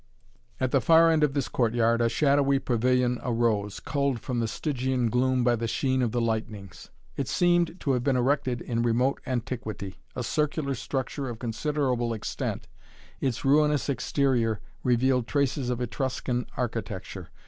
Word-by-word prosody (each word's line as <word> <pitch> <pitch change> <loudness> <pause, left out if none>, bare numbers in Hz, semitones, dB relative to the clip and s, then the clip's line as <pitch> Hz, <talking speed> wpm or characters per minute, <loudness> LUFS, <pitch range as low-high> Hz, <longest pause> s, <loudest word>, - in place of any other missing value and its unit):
At 130 - 0
the 135 - +3
far 165 +5 +6
end 155 -1 +3
of 145 -1 +1
this 140 - 0
courtyard 115 -1 +1
a 115 - +3
shadowy 140 +2 +3
pavilion 125 0 +1
arose, 115 -4 0
culled 140 -4 -1
from 125 +1 -3
the 115 - 0
Stygian 130 -2 -1
gloom 130 +1 +2
by 120 0 +3
the 115 0 -2
sheen 130 +2 0
of 120 -3 +1
the 120 - 0
lightnings. 110 -5 -4 0.3
It 140 - -2
seemed 175 +4 +2
to 140 - 0
have 125 -2 0
been 135 -1 +2
erected 130 -1 +1
in 115 -1 -2
remote 120 +3 +1
antiquity. 115 -6 -4 0.2
A 125 - -3
circular 150 +1 -1
structure 130 +2 -3
of 120 - -6
considerable 125 0 -1
extent, 110 - -4 0.5
its 130 -2 -2
ruinous 150 +1 +3
exterior 125 -4 +1 0.2
revealed 125 0 +2
traces 140 -2 0
of 125 -1 -1
Etruscan 125 0 -2
architecture. 100 -7 -4
125 Hz, 155 wpm, -27 LUFS, 115-140 Hz, 0.5 s, far